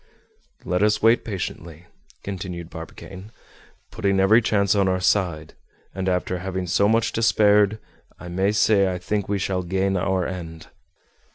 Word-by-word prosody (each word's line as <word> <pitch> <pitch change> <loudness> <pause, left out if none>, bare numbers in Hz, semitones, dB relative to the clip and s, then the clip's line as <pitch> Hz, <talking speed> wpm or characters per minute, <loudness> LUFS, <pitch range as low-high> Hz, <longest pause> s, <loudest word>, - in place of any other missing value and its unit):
"Let 90 +1 -1
us 105 0 +2
wait 115 +2 +4
patiently," 85 -4 -6 0.4
continued 90 -3 -6
Barbicane. 95 +5 -10 0.6
"Putting 100 -1 0
every 105 +5 +5
chance 100 -2 +1
on 100 -2 +2
our 95 0 +1
side, 90 -5 0 0.4
and 95 0 -2
after 90 0 -1
having 95 0 -4
so 100 +4 +2
much 115 +1 +1
despaired, 105 -2 +3 0.4
I - - -9
may 95 +3 0
say 105 -2 +3
I 90 - -3
think 100 +1 -3
we 100 - 0
shall 95 -1 -2
gain 95 +2 -1
our 95 -1 0
end." 80 -3 -7
95 Hz, 150 wpm, -23 LUFS, 90-105 Hz, 0.6 s, every